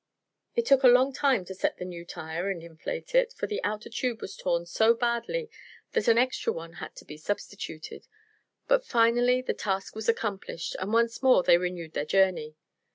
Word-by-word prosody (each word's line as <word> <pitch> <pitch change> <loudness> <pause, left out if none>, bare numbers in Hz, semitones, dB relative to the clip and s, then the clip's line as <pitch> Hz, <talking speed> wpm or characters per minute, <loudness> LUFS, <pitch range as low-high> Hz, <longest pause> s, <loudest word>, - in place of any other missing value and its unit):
It 470 -1 +1
took 275 - +5
a 260 - +7
long 255 +2 +5
time 265 -8 +2
to 190 - -7
set 190 - -1
the 180 - -5
new 175 -2 -7
tire 165 +3 -4
and 175 -4 -4
inflate 170 - -7
it, - - +3
for - - -3
the 420 - -4
outer 210 +1 -2
tube 235 0 -2
was 195 - -7
torn 170 -2 -1
so 220 +6 +3
badly 240 - -1 0.4
that 465 - 0
an 230 - +5
extra 255 +2 +1
one 165 0 -7
had - - -8
to - - -12
be 150 - -10
substituted. 195 -1 -6 0.6
But - - +3
finally 245 - +3
the - - -1
task 195 0 -3
was 220 +1 -2
accomplished 205 -7 -2
and 190 +3 -3
once 230 0 +2
more 255 -8 +5
they 170 - +6
renewed 175 -3 -4
their 145 - -2
journey. 180 -4 +2
220 Hz, 195 wpm, -28 LUFS, 180-250 Hz, 0.6 s, a